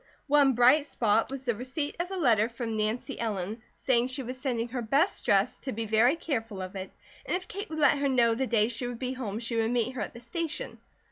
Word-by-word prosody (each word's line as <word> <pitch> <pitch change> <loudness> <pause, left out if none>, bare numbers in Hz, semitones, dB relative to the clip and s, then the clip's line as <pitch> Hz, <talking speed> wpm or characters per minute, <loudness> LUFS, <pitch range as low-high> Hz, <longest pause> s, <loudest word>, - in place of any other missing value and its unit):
One 285 -2 +4
bright 255 +5 +5
spot 225 -3 +1
was 270 0 -6
the 240 - +2
receipt 260 +6 -3
of 350 +1 -2
a 385 - -4
letter 230 - +3
from 230 -1 -4
Nancy 215 +3 -2
Ellen 215 -1 -3
saying 245 -2 +2
she 260 +1 -3
was 255 +1 -6
sending 240 -4 -1
her 250 +1 -3
best 280 - +1
dress, 205 0 +2
to 265 - -5
be 225 0 -3
very 225 +6 +4
careful 225 - -3
of 185 +1 -6
it, 190 0 -5 0.3
and - - -1
if 370 - -11
Kate 405 +3 -6
would 315 - -5
let 290 -2 +4
her 280 0 +1
know 240 -3 +4
the 260 +3 -1
day 220 -3 +3
she 245 +1 -3
would 245 -1 -5
be 255 +1 -3
home 225 -6 -4
she 230 0 -2
would 225 0 +2
meet 240 0 +1
her 255 - -5
at - - -5
the - - -8
station. 330 - -4
245 Hz, 245 wpm, -28 LUFS, 225-275 Hz, 0.3 s, bright